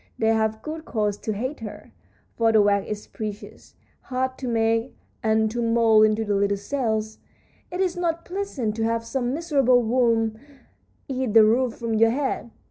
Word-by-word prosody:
They 220 - +1
have 220 -1 0
good 315 +1 -6
cause 210 -7 -1
to 220 - -3
hate 255 +8 -4
her, 215 -3 -9 0.4
for 230 -1 +3
the 220 - +5
wax 200 -1 +2
is 210 0 -5
precious, 210 -1 -8 0.3
hard 260 0 -2
to 260 - -4
make 225 +1 0 0.2
and 220 -2 +2
to 240 +1 -2
mould 230 -2 +4
into 215 +1 0
the 205 - 0
little 200 0 +1
cells. 220 -1 -2 0.5
It 360 +1 -3
is 370 -2 0
not 335 -1 -1
pleasant 350 - -3
to 225 - -1
have 230 0 0
some 245 +1 -2
miserable 275 -7 +3
worm 225 -2 +1 0.7
eat 255 -5 -2
the 225 - +9
roof 235 +3 +2
from 230 -1 -3
your 225 +1 +4
head. 265 -1 -2
230 Hz, 175 wpm, -24 LUFS, 220-260 Hz, 0.7 s, the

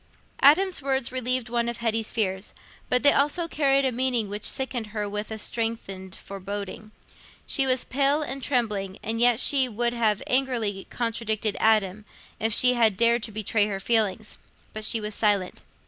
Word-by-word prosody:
Adam's 360 +5 +4
words 265 -3 -1
relieved 255 -1 -1
one 235 0 -1
of 235 - -5
Hetty's 225 -1 -1
fears, 190 -3 -2 0.3
but 250 - +2
they 285 - +7
also 300 +5 +1
carried 275 -3 +1
a 260 - +1
meaning 245 -3 -1
which 205 +1 -4
sickened 255 -4 -3
her 210 -1 -4
with 210 +1 -5
a 220 - -5
strengthened 210 -4 -4
foreboding. 200 +2 -7 0.5
She 270 -1 +1
was 255 -1 +2
pale 280 +3 +1
and 275 -1 -4
trembling, 210 -8 -1
and 225 +1 -2
yet 240 -1 +5
she 265 -2 +3
would 235 +2 -1
have 220 -4 0
angrily 240 -7 0
contradicted 225 -3 -2
Adam, 215 -2 +2 0.3
if 225 +1 0
she 250 +3 +5
had 225 -5 +3
dared 235 0 +3
to 220 - -5
betray 215 0 0
her 195 -2 -4
feelings. 215 -1 -1 0.3
But 215 0 -3
she 225 - +1
was 210 0 -5
silent. 205 -4 0
230 Hz, 170 wpm, -25 LUFS, 210-255 Hz, 0.5 s, they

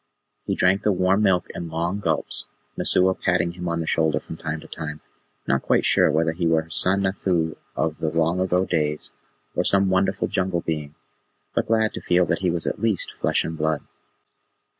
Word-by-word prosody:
He - - 0
drank 95 +3 +3
the 105 - +2
warm 95 +2 +2
milk 95 -4 +3
in 85 -1 -6
long 85 +5 -2
gulps, 80 -6 -1 0.3
Messua 95 +1 +4
patting 90 -2 0
him 90 0 -6
on 85 0 -1
the - - -3
shoulder 80 -4 +1
from - - -9
time 80 -1 -4
to - - -13
time, 75 -2 -6 0.5
not 70 - +1
quite - - +2
sure - - +4
whether 80 +1 +2
he 85 +1 -1
were 80 -1 +2
her 80 - -18
son 95 +4 +3
Nathoo 90 -4 0 0.2
of 80 +2 -1
the 80 - 0
long 85 +2 +1
ago 95 0 +1
days, 75 -4 -1 0.4
or - - +1
some 100 -1 +3
wonderful 95 +1 +1
Jungle 90 -2 -1
being, 75 -3 -4 0.6
but - - 0
glad 110 -1 +2
to - - -6
feel 90 0 +3
that - - -1
he 95 - 0
was 85 -1 0
at - - -3
least 110 -5 0
flesh - - 0
and 80 - -4
blood. 80 -1 -1
85 Hz, 200 wpm, -23 LUFS, 80-95 Hz, 0.6 s, Messua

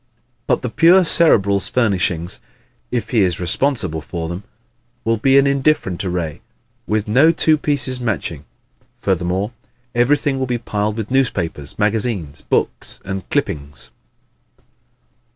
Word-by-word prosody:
But - - +1
the 125 - -1
pure 175 +6 +5
Cerebral's 100 - +3
furnishings 95 -7 0 0.5
if 115 -3 -3
he 115 - +3
is 90 -3 +1
responsible 90 - 0
for 80 +1 -5
them 90 +3 -5 0.6
will 115 0 +2
be 135 +5 +4
an 140 - +6
indifferent 140 - +1
array, 90 -5 -3 0.5
with 105 -1 0
no 135 +10 +5
two 160 -1 +3
pieces 145 -4 -1
matching. 100 - -3 0.5
Furthermore, 95 +2 -1 0.4
everything 135 +3 +2
will 130 - -1
be 125 -1 0
piled 105 -2 -2
with 110 +1 -4
newspapers, 85 - -1
magazines, 105 - -1
books - - -2
and 95 0 -5
clippings. 70 -3 -3
105 Hz, 125 wpm, -19 LUFS, 90-130 Hz, 0.6 s, an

